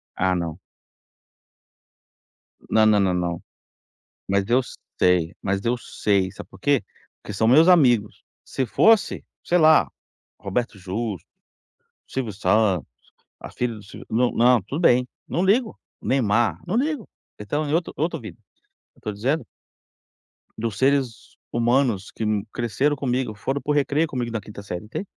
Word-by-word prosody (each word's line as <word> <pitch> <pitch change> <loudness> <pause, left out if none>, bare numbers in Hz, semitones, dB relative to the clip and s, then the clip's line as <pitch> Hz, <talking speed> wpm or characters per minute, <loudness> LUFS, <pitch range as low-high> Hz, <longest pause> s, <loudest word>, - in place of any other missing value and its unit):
Ah 95 0 +1
não. 85 -2 -3 2.1
Na 110 0 +4
na 105 -1 +5
na 95 -2 +2
não, 85 -2 -2 0.9
mas 100 0 +1
eu 125 +2 +3 0.4
sei, 90 -1 +3
mas 100 0 -1
eu 120 +1 +2
sei, 100 -5 0
sabe - - -11
por - - -15
quê? - - +2 0.4
Porque 105 - -8
são 110 +3 +1
meus 155 +8 +6
amigos, 125 - +4 0.2
se 130 - -2
fosse, 220 - +3 0.2
sei 175 - +2
lá, 155 -2 +5 0.5
Roberto 105 +3 -3
Justos, 100 +1 -4 0.8
Silvio 125 -6 -3
Santos, 105 -2 +1 0.5
a - - -8
filha 125 -1 -2
do 105 - -11
Silvio 100 - -12
na 120 +2 +2 0.2
não, 115 - +1
tudo 135 - -5
bem, 125 -7 +4 0.2
não 175 +3 0
ligo, 220 +4 +2 0.2
Neymar, 120 -3 +1
não 185 +5 -1
ligo, 285 -2 -1 0.3
eles 105 - -8
estão 150 +7 -1
em 145 - 0
outro 170 +1 0
outra 160 +3 -1
vida, 105 -7 -10 0.6
eu - - -25
tô 105 - -3
dizendo 125 +6 -1 1.1
dos 110 -3 -3
seres 130 -3 0
humanos 120 -3 +1
que - - -4
n 105 -1 0
cresceram 130 +5 0
comigo, 125 -4 -2
foram 135 +7 -3
para 150 - -2
o - - +3
recreio 145 +2 +1
comigo 125 -5 -3
na 115 -2 -3
quinta 105 -1 -10
série, 90 +1 -6
entende? 115 - -5
115 Hz, 155 wpm, -23 LUFS, 100-140 Hz, 2.1 s, meus